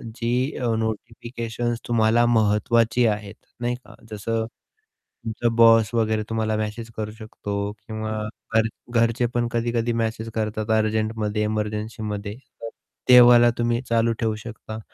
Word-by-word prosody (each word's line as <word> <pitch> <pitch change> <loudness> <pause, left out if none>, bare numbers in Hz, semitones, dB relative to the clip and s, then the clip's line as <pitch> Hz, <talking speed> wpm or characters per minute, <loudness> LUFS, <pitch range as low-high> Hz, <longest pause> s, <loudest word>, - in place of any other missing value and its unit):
जी 115 -1 -2 0.3
अ, 120 -2 0
notifications 115 +1 -3
तुम्हाला 115 0 +3
महत्त्वाची 115 +1 +3
आहेत, 105 -1 -2 0.2
नाही 120 0 -1
का. 125 - -15 0.2
जसं 110 +2 -2 0.8
तुमचा 115 +1 0
बॉस 115 0 +6
वगैरे 110 -2 +1
तुम्हाला 110 -1 0
मेसेज 110 +2 -4
करू 105 -1 -3
शकतो, 100 -2 -4
किंवा 110 0 -6 0.4
घर 110 0 +4 0.3
घरचे 115 +2 +2
पण 120 0 +1
कधी-कधी 120 0 0
मेसेज 110 0 -3
करतात 110 0 -2
अर्जंटमध्ये 110 0 0
एमर्जन्सीमध्ये. 105 -1 -3
तर 115 -2 -11 0.4
तेव्हाला 120 -1 +8
तुम्ही 120 +1 0
चालू 115 0 +2
ठेवू 110 -2 0
शकता 110 0 -8
110 Hz, 125 wpm, -23 LUFS, 110-120 Hz, 0.8 s, तेव्हाला